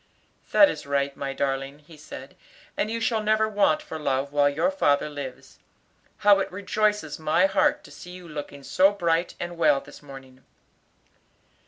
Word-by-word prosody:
"That 300 - +7
is 150 - -5
right, 140 0 0
my 140 -1 -4
darling," 135 0 -2
he 150 +2 -17
said, 155 +1 -11 0.4
"and 215 - -1
you 230 +1 -2
shall 225 -1 0
never 215 +1 +2
want 205 -7 +2
for 160 - -7
love 140 -1 -1
while 145 -1 +4
your 155 - 0
father 145 - +2
lives. 140 -3 -9 0.6
How 205 -1 +5
it 195 - -2
rejoices 200 -3 -1
my 155 +4 +3
heart 195 - +2
to - - -14
see 180 - -11
you 180 -1 -10
looking 145 -2 -8
so 185 +9 +4
bright 170 -3 0
and 175 0 -6
well 150 -4 +4
this 140 - -14
morning." 135 -2 -13
155 Hz, 170 wpm, -25 LUFS, 140-195 Hz, 0.6 s, That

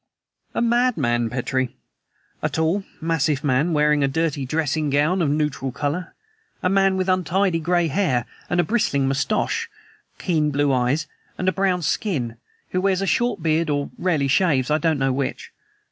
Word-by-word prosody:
"A - - +1
madman, 190 - +2
Petrie. 130 +1 -2 0.7
A - - 0
tall, 160 +5 0 0.2
massive 155 -3 0
man, 145 +4 +2
wearing 150 -1 +3
a - - +3
dirty 145 -2 -1
dressing 155 +1 0
gown 150 +7 +2
of 155 - +2
neutral 150 -3 -1
color; 145 +6 -3 0.5
a 180 - +3
man 195 0 +3
with 185 0 -1
untidy 185 0 +1
gray 175 +1 +1
hair 145 -7 +1 0.2
and 175 - +1
a - - +5
bristling 145 - +1
mustache, 215 - 0 0.5
keen 155 -5 +1
blue 145 -1 +1
eyes, 130 +5 +1 0.3
and 185 - -2
a - - +5
brown 185 -1 0
skin; 130 - -1 0.3
who 185 - 0
wears 195 0 +1
a - - 0
short 195 +1 0
beard 160 0 +1
or 145 -1 -1
rarely 160 -6 0
shaves 140 -3 +2
I 155 - +3
don't 160 -1 +1
know 135 -1 +1
which. 135 0 -3
155 Hz, 165 wpm, -22 LUFS, 140-185 Hz, 0.7 s, a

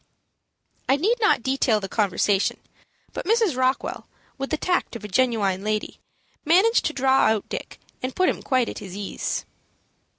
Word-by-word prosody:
I 270 - +5
need 430 - +1
not 420 - +3
detail 260 -4 +2
the 195 - -5
conversation; 200 -1 +1 0.6
but - - -5
Mrs. 445 - +2
Rockwell, 260 +1 -1 0.3
with 270 - -3
the 310 - 0
tact 355 -5 -1
of 225 - -7
a - - -5
genuine 205 -4 +1
lady, 215 0 -2 0.4
managed 380 +9 +4
to 310 - 0
draw 265 -1 +3
out 220 -2 0
Dick, - - -6 0.2
and 255 0 -4
put 370 - +2
him - - -1
quite 255 -3 +1
at - - -6
his 190 -1 -8
ease. 205 -1 -3
255 Hz, 165 wpm, -24 LUFS, 210-310 Hz, 0.6 s, I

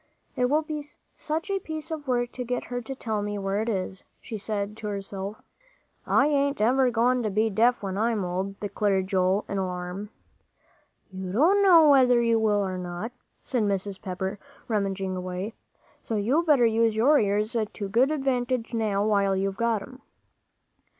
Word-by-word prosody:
"It 250 - +2
will 305 +3 +2
be 305 -1 -5 0.3
such 320 +6 -3
a 390 - 0
piece 315 -2 -6
of 300 -3 -5
work 245 -1 0
to 250 - -5
get 245 0 -2
her 245 0 -4
to 265 +3 -6
tell 220 -5 -2
me 205 0 -3
where 195 +1 -1
it 225 - -2
is," 190 -2 -3 0.2
she 230 - -7
said 210 0 -3
to 215 - -6
herself. 200 0 -5 0.6
"I 275 - +4
ain't 280 -1 +1
ever 255 +4 +3
goin' 245 +2 +2
to 215 - -1
be 215 +2 +1
deaf 235 +3 +2
when 195 0 -3
I'm 220 -3 +1
old," 190 +3 -3
declared 200 -1 0
Joel, 190 +1 +1
in 200 - -2
alarm. 180 +2 -4 1.0
"You 190 -1 -6
don't 335 - +4
know 340 -5 +7
whether 255 -4 +6
you 230 -1 +3
will 210 -2 +2
or 185 -1 -3
not," 180 +5 -5 0.3
said 250 -3 -1
Mrs. 200 -1 -1
Pepper, 190 +1 -4 0.3
rummaging 195 -3 -1
away, 185 +3 -4 0.5
"so 225 - -4
you 235 +10 +2
better 295 -8 +4
use 225 -1 +2
your 275 +7 +5
ears 210 +3 0 0.2
to 200 - -5
good 240 +7 +3
advantage 255 -5 -1
now, 210 -3 0
while 200 -2 +2
you've 195 0 -1
got 230 -3 0
'em." 255 +3 -13
215 Hz, 175 wpm, -26 LUFS, 195-250 Hz, 1.0 s, know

